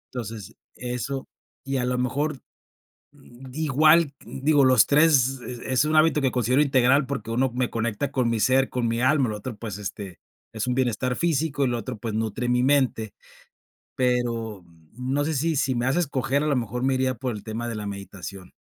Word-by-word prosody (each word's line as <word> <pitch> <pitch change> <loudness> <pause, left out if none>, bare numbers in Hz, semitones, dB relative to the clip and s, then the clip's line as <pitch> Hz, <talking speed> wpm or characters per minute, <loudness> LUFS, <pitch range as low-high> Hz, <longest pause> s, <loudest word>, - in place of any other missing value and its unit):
Entonces, 110 -5 -6 0.2
eso, 125 +2 -4 0.4
y 135 0 -1
a 125 - 0
lo 125 0 -1
mejor, 140 +4 -1 0.7
mm, 135 -2 -15
igual 155 +1 +4
digo, 145 +1 +2
los 130 -4 +6
3 140 -4 +4
es 125 -1 -6
es 130 +3 +1
un 155 +1 0
hábito 155 -1 +4
que 135 - +2
considero 125 +3 +2
integral 135 0 +3
porque 130 -5 -4
uno 125 +2 +1
me 125 0 -1
conecta 115 +3 -2
con 125 -3 +1
mi 115 -1 0
ser, 130 +4 +3
con 125 -2 -1
mi 115 +1 -1
alma, 135 +1 +3
el - - -3
otro, 110 +2 -7
pues, 105 -3 -6
este, 100 -2 -7 0.3
es 110 +1 -3
un 125 - 0
bienestar 125 0 0
físico, 155 -3 0
y - - +2
lo 120 -1 -1
otro, 120 +2 -6
pues, 115 0 -5
nutre 110 +2 -2
mi 125 0 +2
mente, 130 -6 +1 0.8
pero 120 -5 -1 0.3
no 130 +5 -1
sé 160 - -1
si 155 +2 0
si 130 -1 +1
me 120 0 -1
das 130 +5 +1
a - - +3
escoger, 140 -3 0
a - - 0
lo 145 - +2
mejor 125 0 -2
me 135 0 +2
iría 130 0 0
por 125 0 -3
el 105 - -9
tema 115 +2 -4
de 115 - -4
la 105 -1 -5
meditación. 100 -2 -8
125 Hz, 200 wpm, -25 LUFS, 115-140 Hz, 0.8 s, los